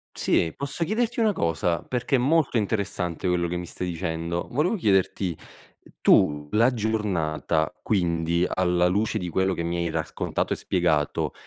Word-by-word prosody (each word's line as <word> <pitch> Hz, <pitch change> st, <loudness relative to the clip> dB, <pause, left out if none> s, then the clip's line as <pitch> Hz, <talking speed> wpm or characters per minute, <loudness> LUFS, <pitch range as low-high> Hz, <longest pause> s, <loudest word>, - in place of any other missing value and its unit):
Sì. 80 Hz, -1 st, +1 dB
Posso 140 Hz, +4 st, -2 dB
chiederti 235 Hz, +4 st, -1 dB
una 215 Hz, -2 st, +3 dB
cosa? 85 Hz, -, 0 dB
Perché 125 Hz, +2 st, 0 dB
è -, -, +1 dB
molto 140 Hz, -1 st, +2 dB
interessante 100 Hz, -5 st, -2 dB
quello 85 Hz, -1 st, +1 dB
che 90 Hz, -, -3 dB
mi 90 Hz, -, -4 dB
stai 90 Hz, +1 st, -5 dB
dicendo. 85 Hz, 0 st, -3 dB
Volevo 155 Hz, -, +1 dB
chiederti: 95 Hz, -, +1 dB, 0.7 s
tu 75 Hz, 0 st, +4 dB
la 115 Hz, +4 st, +4 dB
giornata, 90 Hz, -8 st, -1 dB
quindi, 85 Hz, -3 st, +1 dB
alla 90 Hz, -1 st, +2 dB
luce 105 Hz, +4 st, 0 dB
di 90 Hz, -4 st, -2 dB
quello 95 Hz, +2 st, +1 dB
che 85 Hz, -, -3 dB
mi 85 Hz, +1 st, -2 dB
hai 85 Hz, 0 st, 0 dB
raccontato -, -, -2 dB
e -, -, 0 dB
spiegato, 80 Hz, -5 st, 0 dB
90 Hz, 155 wpm, -25 LUFS, 85-110 Hz, 0.7 s, tu